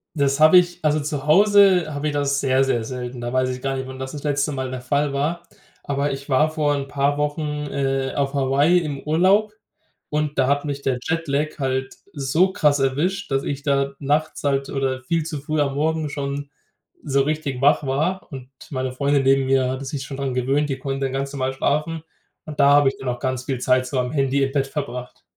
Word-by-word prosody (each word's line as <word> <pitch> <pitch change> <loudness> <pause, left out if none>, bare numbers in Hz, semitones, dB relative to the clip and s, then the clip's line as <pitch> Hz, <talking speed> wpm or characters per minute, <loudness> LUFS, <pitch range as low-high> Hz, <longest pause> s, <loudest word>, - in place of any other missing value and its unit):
Das 140 0 +1
habe 155 +4 +8
ich 175 0 +2
also, 155 0 +2
zu 145 -1 -4
Hause 190 -2 +5
habe 145 +1 -2
ich 150 - -1
das 140 -1 0
sehr, 135 -1 +2
sehr 120 -4 0
selten. 125 0 -6
Da 120 0 -3
weiß 130 0 +1
ich 125 0 -5
gar 135 0 -2
nicht, 130 0 -4
wann 130 0 -9
das 130 0 -5
das 145 - -7
letzte 145 0 0
Mal 130 -2 -4
der 130 -1 -5
Fall 140 +2 0
war. 160 +5 -1 0.4
Aber 140 0 -1
ich 135 +1 -6
war 145 +4 +3
vor 150 -2 0
'n 140 -1 -4
paar 140 +1 0
Wochen, 150 0 -2
äh, 135 -1 -1
auf 140 -1 -1
Hawaii 140 +6 +3
im 145 -5 -4
Urlaub 190 +7 +3 0.6
und 150 0 -2
da 130 - +3
hat 145 +2 +1
mich 140 -1 -4
der 130 -2 -1
Jetlag 155 -2 -2
halt 130 0 -2 0.2
so 155 +6 +2
krass 145 -4 +2
erwischt, 150 +8 -1
dass 135 0 +1
ich 140 0 -4
da 140 -1 +1
nachts 150 +3 -1
halt 140 -1 0
oder 135 -1 -2
viel 165 +3 0
zu 155 -2 -5
früh 155 +1 -1
am 140 -1 -1
Morgen 155 +1 0
schon 140 0 -4 0.5
so 140 -2 +2
richtig 145 -3 -2
wach 145 +2 +4
war 160 +8 -1
und 130 -1 -8 0.2
meine 130 -2 -2
Freundin 140 +1 +1
neben 135 0 +3
mir 130 -1 +2
hatte 130 +1 -4
sich 135 0 -4
schon 135 - -7
daran 135 -2 -2
gewöhnt, 135 +4 0
die 135 -1 -3
konnte 135 0 -2
dann 130 - -3
ganz 135 +1 -2
normal 130 -1 -2
schlafen. 150 +4 -1 0.4
Und 150 -2 -9
da 140 0 +6
habe 145 -1 +5
ich - - -8
dann 135 - -7
auch 120 0 -3
ganz 130 -1 -2
viel 130 -3 -2
Zeit 130 0 +2
so 130 -2 -1
am 125 +1 -1
Handy 135 -1 +1
im 135 - 0
Bett 135 -1 0
verbracht. 125 -4 -6
140 Hz, 220 wpm, -22 LUFS, 135-150 Hz, 0.6 s, habe